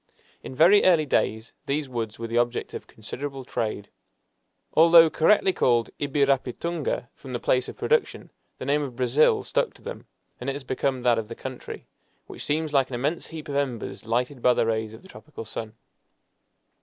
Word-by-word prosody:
In 130 - -8
very 175 +8 +6
early 170 -4 +4
days 110 -4 -1
these 145 +1 -1
woods 115 -4 -4
were 115 - -5
the 115 +1 0
object 120 0 -1
of - - -7
considerable 135 +5 -7
trade. 110 -4 -3 0.9
Although 165 0 +7
correctly 190 +3 +3
called 120 -7 +2
"ibirapitunga," 140 0 -1
from 130 -2 -10
the 120 - -2
place 125 +1 +1
of - - -10
production, 465 -1 0 0.3
the - - -7
name 145 +2 +2
of 135 -4 -5
"brazil" 130 +4 +3
stuck - - -1
to - - -19
them, - - -8 0.3
and 125 - -3
it - - -1
has 140 0 -7
become 130 0 -1
that 120 -2 +3
of 110 - -5
the 115 - -7
country, 130 -2 -8 0.4
which - - -8
seems 155 +1 -1
like 135 -2 +3
an 125 - -4
immense 145 +7 -2
heap 160 -2 -8
of 140 - -4
embers 130 -5 -3
lighted 125 +3 -1
by 125 0 +4
the - - +2
rays 110 -1 -2
of 110 - -15
the - - -14
tropical 155 - -10
sun. 110 0 -6
130 Hz, 185 wpm, -25 LUFS, 120-150 Hz, 0.9 s, Although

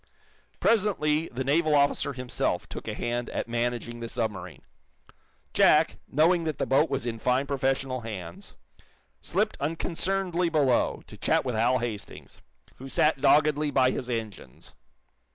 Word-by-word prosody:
Presently, 165 -8 +2
the 130 +2 -3
naval 155 +3 +2
officer 140 0 +2
himself 120 -7 -2
took - - -8
a 105 - -3
hand 120 +1 -3
at - - -3
managing 120 0 -2
the 115 0 -6
submarine. 105 -8 -4 0.9
Jack, - - +4
knowing 165 +4 +3
that 155 -3 -2
the - - -1
boat 140 +4 +3
was - - -2
in 115 -2 -3
fine 125 +3 +1
professional 135 -2 -1
hands, 95 -7 -8 0.7
slipped - - -1
unconcernedly 175 +3 -1
below, 145 -6 +1
to - - -13
chat - - +1
with 125 - -1
Hal 120 +3 +2
Hastings, 115 -4 -7 0.4
who 135 +1 -9
sat 150 0 +2
doggedly 150 +1 +4
by 130 -2 +3
his 125 - -4
engines. 110 -4 -6
130 Hz, 140 wpm, -27 LUFS, 120-150 Hz, 0.9 s, Jack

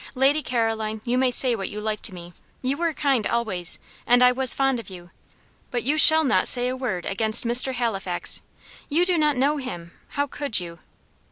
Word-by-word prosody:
"Lady 275 +4 +2
Caroline, 225 -4 -2
you 240 0 -1
may 255 0 +2
say 245 0 +3
what 195 -3 -5
you 210 - -7
like 215 0 -4
to - - -1
me; 175 0 -11 0.3
you 260 +2 -1
were 335 +2 -1
kind 275 -7 -1
always, 195 -8 -2 0.3
and 245 +1 +4
I 250 - +6
was 260 0 +2
fond 270 -2 +1
of 220 - -10
you; 175 -2 -12 0.6
but 240 -3 -3
you 280 +6 0
shall 315 +1 +8
not 275 - +1
say 245 0 +3
a 255 - -3
word 235 -9 -4
against 220 +4 0
Mr. 245 +3 +2
Halifax. 195 -7 -2 0.5
You 330 +4 +1
do 360 -1 +1
not 300 -4 +1
know 285 +4 +1
him 175 -12 -7 0.3
how 285 - +1
could 285 -4 -1
you?" 170 -1 -9
245 Hz, 200 wpm, -23 LUFS, 215-270 Hz, 0.6 s, shall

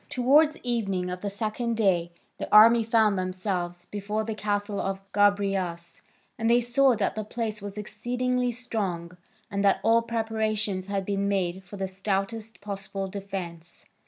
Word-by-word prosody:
Towards 295 +5 +4
evening 195 -7 -1
of 180 0 -5
the 205 - -2
second 220 +3 -2
day 175 -5 +2 0.3
the - - -5
army 225 +2 +8
found 220 -3 +3
themselves 185 -1 -3
before 210 +1 -3
the 220 0 -3
castle 205 -1 -2
of 195 0 -2
Gobryas, 195 -4 +1 0.4
and 225 0 +1
they 240 +1 +6
saw 250 +2 +3
that - - 0
the 215 - -3
place 215 -1 -4
was 205 0 -7
exceedingly 245 +4 -1
strong 195 -8 -3 0.4
and 200 0 -1
that 200 -1 +4
all 230 +1 +5
preparations 220 -4 -2
had 200 -1 -2
been 200 0 -1
made 190 -2 -1
for 200 +2 -10
the 195 0 -2
stoutest 200 +4 -3
possible 195 -1 -5
defence. 185 -4 -7
205 Hz, 155 wpm, -27 LUFS, 190-225 Hz, 0.4 s, army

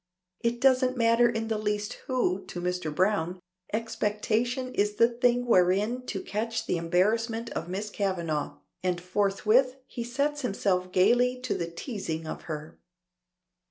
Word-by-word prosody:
It 235 0 -1
doesn't 255 -1 +3
matter 230 +1 +4
in 225 -1 -2
the 220 -1 -1
least 210 0 -1
who 195 -8 0
to 180 - -6
Mr. 180 -2 -2
Browne, 180 +1 +1 0.3
expectation 230 +3 -1
is 205 +1 +1
the 230 - +6
thing 245 +1 +1
wherein 210 +4 +2
to 195 - -3
catch 225 +2 -2
the 180 - 0
embarrassment 225 +7 +1
of - - -4
Miss 205 +3 -4
Kavanagh, 170 -8 -2 0.2
and 180 -1 0
forthwith 205 +7 +2
he 240 -3 -5
sets 285 +5 -1
himself 190 -6 0
gaily 245 +7 +3
to 255 - -1
the 170 - -2
teazing 170 - -5
of 155 - -5
her. 155 0 -6
215 Hz, 145 wpm, -28 LUFS, 185-240 Hz, 0.3 s, the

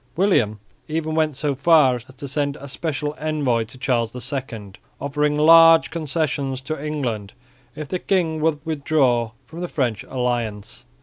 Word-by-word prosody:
William 155 - +2 0.3
even 160 0 -2
went 155 -2 +1
so 145 +1 -1
far 140 -1 +4
as 120 - -11
to 135 +2 -9
send 145 +1 -1
a 140 -1 -10
special 150 +1 -3
envoy 145 -7 0
to 120 - -13
Charles 125 -4 -1 0.2
II, 115 -7 -5 0.3
offering 150 +1 0
large 165 +1 +7
concessions 150 -4 -2
to 150 +2 -5
England, 120 -10 -3 0.4
if 155 - -6
the 180 - -3
king 165 -5 0
would 155 -1 0
withdraw 140 -6 +1 0.2
from 165 +2 -9
the 180 - -2
French 120 -8 -1
alliance. 120 -3 -3
145 Hz, 150 wpm, -22 LUFS, 125-155 Hz, 0.4 s, large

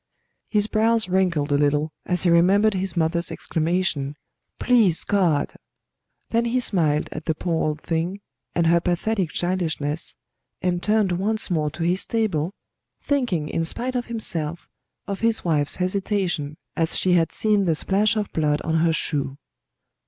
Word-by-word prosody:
His 210 -2 +2
brows 220 0 +2
wrinkled 180 -6 +1
a 145 - +3
little 150 +1 +1 0.2
as 180 -1 0
he 175 - +3
remembered 195 +6 +4
his 190 -1 -2
mother's 170 +1 0
exclamation, 160 -4 -1 0.4
"Please 225 -10 +3
God"; 175 -8 +1 0.8
then 230 +1 +2
he 240 +2 +1
smiled 160 -10 +1
at 155 - -7
the 160 - 0
poor 165 0 -1
old 150 0 -3
thing 170 +4 -2 0.4
and 170 - +2
her 170 +1 +4
pathetic 180 +2 -1
childishness, 165 -4 -2 0.4
and 180 -1 -1
turned 210 -2 +2
once 205 +4 0
more 155 -3 +1
to 165 - -5
his 180 +3 0
table, 190 -8 0 0.5
thinking 245 - 0
in 165 - -1
spite 245 +10 -2
of 245 -1 -2
himself 170 -8 -2 0.4
of 200 -1 -4
his 230 -3 +1
wife's 150 -4 +1
hesitation 185 -5 -1 0.2
as 165 0 +1
she 185 - +2
had 165 -2 +3
seen 210 -2 +1
the 165 -3 +2
splash 205 +7 +2
of 210 -2 -2
blood 150 -2 +1
on 160 0 0
her 165 0 +3
shoe. 140 -4 -2
175 Hz, 155 wpm, -23 LUFS, 160-205 Hz, 0.8 s, remembered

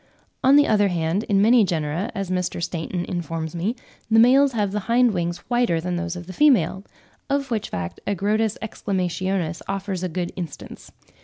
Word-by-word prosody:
On 265 +2 +6
the 290 0 +6
other 205 -4 +3
hand, 175 +3 -1
in 200 -1 +3
many 230 +1 +6
genera, 165 +2 -2
as 195 -2 -3
Mr. 180 -2 -1
Stainton 170 +1 -3
informs 165 -2 -4
me, 195 +8 -1 0.3
the 225 - +4
males 260 +4 +6
have 205 -4 0
the 210 - -1
hind 240 -1 +4
wings 175 -1 -2
whiter 240 -9 +1
than 180 +2 -3
those 175 0 -3
of 175 -1 -7
the 185 - -9
female—of 265 - 0
which 220 -3 -2
fact 85 -1 -5
Agrotis 210 +2 0
exclamationis 185 -4 -2
offers 195 -2 -3
a 185 - -2
good 175 +1 -3
instance. 170 -6 -8
190 Hz, 170 wpm, -23 LUFS, 175-220 Hz, 0.3 s, On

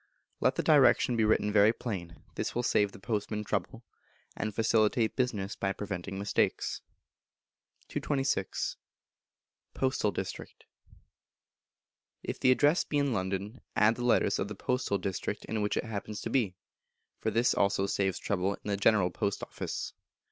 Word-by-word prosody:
Let - - +2
the - - -1
Direction 125 - +5
be 110 - +2
written 105 -1 +2
very 105 +1 +6
plain; 90 - -6
this - - -3
will 120 - 0
save 105 -4 +2
the - - -12
postman 105 +1 -2
trouble, - - -3 0.5
and 110 - -2
facilitate 110 +1 +2
business 105 -6 -1
by 95 0 -1
preventing 95 -2 -5
mistakes. 100 +1 0 1.1
226. 135 -9 -1 1.0
Postal 130 -5 +1
District. 95 -2 -6 1.6
If - - -4
the 130 - +4
Address 145 +6 +4
be 145 - -2
in 140 -3 +1
London 100 +4 -3
add 105 +1 +5
the 120 - -5
letters 120 - +3
of 95 - -1
the 105 - -6
postal 125 -1 0
district 95 0 -3
in 110 -1 -2
which 105 - 0
it - - 0
happens 105 -1 -5
to - - -4
be, 110 -9 +1 0.6
for - - 0
this 115 +3 +2
also 100 0 +2
saves 95 -1 0
trouble 100 0 -1
in - - -8
the 100 - 0
General 100 -3 +3
Post 100 +2 -2
Office. - - -5
105 Hz, 150 wpm, -30 LUFS, 100-115 Hz, 1.6 s, very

